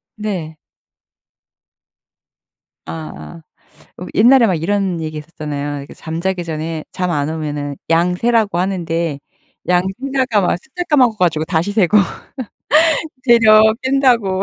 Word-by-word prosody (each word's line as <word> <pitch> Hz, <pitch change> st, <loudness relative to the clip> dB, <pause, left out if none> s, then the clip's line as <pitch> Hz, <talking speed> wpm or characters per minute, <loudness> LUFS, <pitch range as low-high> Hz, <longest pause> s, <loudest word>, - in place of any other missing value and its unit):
네. 185 Hz, -8 st, -5 dB, 2.3 s
아. 165 Hz, +1 st, -8 dB, 0.6 s
어 180 Hz, -, -6 dB
옛날에 240 Hz, +2 st, +6 dB
막 185 Hz, -, +1 dB
이런 185 Hz, +1 st, -1 dB
얘기 155 Hz, -1 st, -5 dB
했었잖아요. 145 Hz, -2 st, -5 dB
이렇게 140 Hz, -, -10 dB
잠자기 175 Hz, +3 st, -3 dB
전에 160 Hz, -1 st, -4 dB
잠 180 Hz, -1 st, -2 dB
안 145 Hz, -2 st, -1 dB
오면은 150 Hz, -2 st, -4 dB, 0.2 s
양 170 Hz, +2 st, +2 dB
세라고 225 Hz, -2 st, +1 dB
하는데 170 Hz, -5 st, -2 dB, 0.5 s
양 180 Hz, 0 st, +3 dB, 0.2 s
세다가 265 Hz, -5 st, 0 dB
막 180 Hz, -, +1 dB
숫자 355 Hz, +6 st, -5 dB
까먹어 255 Hz, -7 st, +4 dB
가지고 160 Hz, -4 st, +1 dB
다시 170 Hz, +3 st, -1 dB
세고. 205 Hz, -1 st, +3 dB, 1.3 s
되려 225 Hz, -3 st, +6 dB, 0.2 s
깬다고. 245 Hz, -8 st, +2 dB
180 Hz, 240 characters per minute, -17 LUFS, 160-215 Hz, 2.3 s, 옛날에